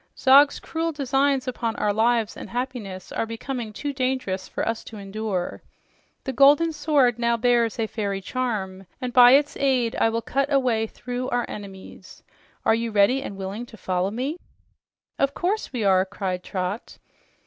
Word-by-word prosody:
Zog's 280 +2 +6
cruel 330 0 -2
designs 275 -2 +1
upon 235 -3 -2
our 205 -1 0
lives 225 0 +1
and - - -9
happiness 235 -7 -5
are 225 - -2
becoming 230 0 -5
too 285 +7 -4
dangerous 255 -8 -2
for - - -3
us 225 0 -2
to 220 - -9
endure. 200 -2 -4 0.6
The 265 - -3
golden 290 +5 +5
sword 290 -6 +2
now 235 0 +2
bears 235 -1 +2
a 225 - 0
fairy 200 -3 -3
charm, 195 -4 -3
and 250 -1 -4
by 245 0 +8
its 290 +1 +3
aid 255 -4 +1
I - - +3
will 230 0 -2
cut 275 +5 -1
a 280 - +5
way 230 -4 +1
through 250 +2 -5
our 245 -1 0
enemies. 195 -2 -10 0.4
Are - - +5
you 230 +1 -1
ready 215 +5 +3
and 200 -7 -7
willing 195 +5 -5
to 220 - -13
follow 185 -1 -1
me?" 260 - -3 0.8
"Of 275 0 +1
course 395 +5 -1
we 245 -5 -2
are!" 190 -2 +4
cried 190 -2 -4
Trot. 185 +3 -4
235 Hz, 170 wpm, -24 LUFS, 205-265 Hz, 0.8 s, by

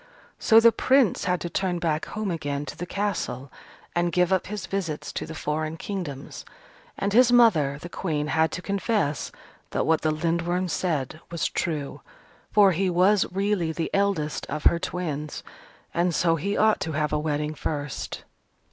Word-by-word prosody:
So 225 - +6
the 230 0 +7
Prince 260 -5 +3
had 180 -1 +1
to 175 - -3
turn 180 0 0
back 160 -2 -1
home 215 -3 -3
again 145 -3 -3
to 130 - -7
the 175 - -6
Castle, 185 -11 -3 0.4
and 175 0 +1
give 180 +1 +2
up 190 - +1
his 210 -1 -5
visits 175 -6 -3
to - - -4
the 160 - -7
foreign 155 +2 -2
kingdoms. 165 -9 -6 0.5
And 200 +1 -1
his 245 +1 +6
mother, 175 - +5
the 175 - -7
Queen, 155 -4 -2
had 160 0 +2
to 180 - -5
confess 200 -7 -1 0.4
that - - -1
what 160 -1 +2
the 155 - +1
Lindworm 170 +3 0
said 155 -5 -2
was 170 -1 -2
true. 150 -5 -2 0.5
For 205 -2 +6
he 185 +2 +1
was 185 +3 +3
really 195 -3 0
the 165 0 -3
eldest 195 -7 0
of 150 +1 -4
her 170 - +4
twins: 155 -5 -4 0.5
and 175 -1 +1
so 165 0 +3
he 200 +6 -2
ought 220 0 +4
to 160 - -3
have 150 0 -1
a 150 - +2
wedding 150 0 -1
first. 145 -3 -4
170 Hz, 175 wpm, -25 LUFS, 155-195 Hz, 0.5 s, the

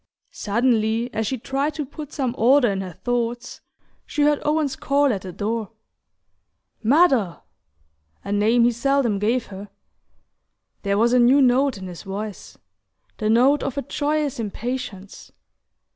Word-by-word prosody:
Suddenly, 230 +1 0
as 220 -1 -1
she 260 - -2
tried 275 +5 -2
to 300 -2 -3
put 295 +1 -9
some 260 -5 -2
order 250 -1 +4
in 195 -1 -2
her 185 -2 -7
thoughts, 240 +2 -3 0.4
she 295 0 -1
heard 295 0 +2
Owen's 300 -2 0
call 280 -2 +1
at 195 - -4
the 185 - -7
door: 220 +3 -3 1.1
"Mother! 255 - +3 0.4
" 75 +1 -43
a 200 - -6
name 220 +4 +3
he 240 - +4
seldom 240 -3 +1
gave 230 +4 0
her. 200 +2 -9 1.1
There 200 -1 0
was 235 +3 +3
a 250 - +5
new 250 +4 +5
note 265 -1 +3
in 190 - -8
his 180 -2 -8
voice: 205 0 -7 0.6
the 215 - -1
note 255 +6 +4
of 275 0 -4
a 280 - -1
joyous 295 0 -2
impatience. 220 -2 -6
240 Hz, 150 wpm, -22 LUFS, 210-275 Hz, 1.1 s, a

